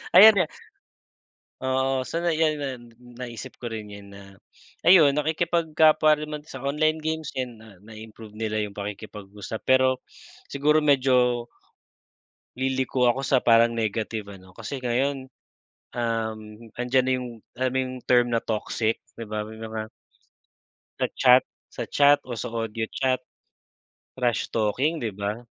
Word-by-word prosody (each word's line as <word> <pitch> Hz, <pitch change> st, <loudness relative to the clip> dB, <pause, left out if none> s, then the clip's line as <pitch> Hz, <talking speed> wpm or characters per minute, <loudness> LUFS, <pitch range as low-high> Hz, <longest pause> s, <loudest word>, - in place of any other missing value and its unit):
Ayan 215 Hz, +4 st, +10 dB
nga 180 Hz, -4 st, +3 dB, 1.2 s
oo, 130 Hz, 0 st, 0 dB
so 165 Hz, -, -3 dB
na 175 Hz, 0 st, +1 dB
yan 155 Hz, -1 st, +2 dB
na, 140 Hz, -1 st, -2 dB, 0.6 s
naisip 120 Hz, -2 st, -9 dB
ko 120 Hz, -2 st, -5 dB
rin 110 Hz, -2 st, -6 dB
yan 100 Hz, -1 st, -11 dB
na, 100 Hz, 0 st, -11 dB, 0.6 s
ayun, 165 Hz, -6 st, +7 dB
nakikipagkapwa 155 Hz, 0 st, +3 dB
rin 150 Hz, -, -5 dB
man 150 Hz, -1 st, -5 dB
sa 135 Hz, -, -9 dB
online 155 Hz, +3 st, +1 dB
games 160 Hz, 0 st, -3 dB
yan, 125 Hz, -2 st, -4 dB
na 110 Hz, -4 st, -15 dB
na-improve 110 Hz, 0 st, -12 dB
nila 110 Hz, -1 st, -2 dB
'yong 105 Hz, -1 st, -5 dB
pakikipag-usap. 105 Hz, 0 st, -7 dB
Pero, 130 Hz, 0 st, +3 dB, 0.5 s
siguro 150 Hz, +2 st, +3 dB
medyo, 125 Hz, -4 st, +3 dB, 1.1 s
liliko 130 Hz, -1 st, 0 dB
ako 130 Hz, +3 st, 0 dB
sa 135 Hz, -, +3 dB
parang 115 Hz, 0 st, +5 dB
negative 110 Hz, -1 st, -3 dB
ano, 95 Hz, -1 st, -15 dB
kasi 140 Hz, -, -5 dB
ngayon, 130 Hz, +2 st, -1 dB, 0.7 s
um, 115 Hz, -2 st, -1 dB, 0.4 s
andiyan 125 Hz, +1 st, +1 dB
na -, -, +2 dB
'yong, 125 Hz, -1 st, -4 dB, 0.3 s
alam 130 Hz, 0 st, 0 dB
mo -, -, 0 dB
'yong, 130 Hz, 0 st, -5 dB
term, 120 Hz, -1 st, +4 dB
na 115 Hz, -1 st, +1 dB
toxic, 110 Hz, 0 st, -1 dB, 0.2 s
'di 115 Hz, -, -5 dB
ba, 105 Hz, 0 st, -2 dB
may 110 Hz, -, -10 dB
mga 110 Hz, -1 st, -5 dB, 1.1 s
Sa -, -, +2 dB
chat 125 Hz, 0 st, +6 dB, 0.3 s
sa -, -, -5 dB
chat 145 Hz, 0 st, +5 dB
o 125 Hz, -, -6 dB
sa 115 Hz, 0 st, -4 dB
audio 115 Hz, -1 st, -3 dB
chat, 130 Hz, -1 st, 0 dB, 0.9 s
trash 125 Hz, -3 st, 0 dB
talking, 130 Hz, +9 st, 0 dB
'di 110 Hz, -, -1 dB
ba? 100 Hz, +4 st, -4 dB
125 Hz, 145 wpm, -25 LUFS, 110-140 Hz, 1.2 s, Ayan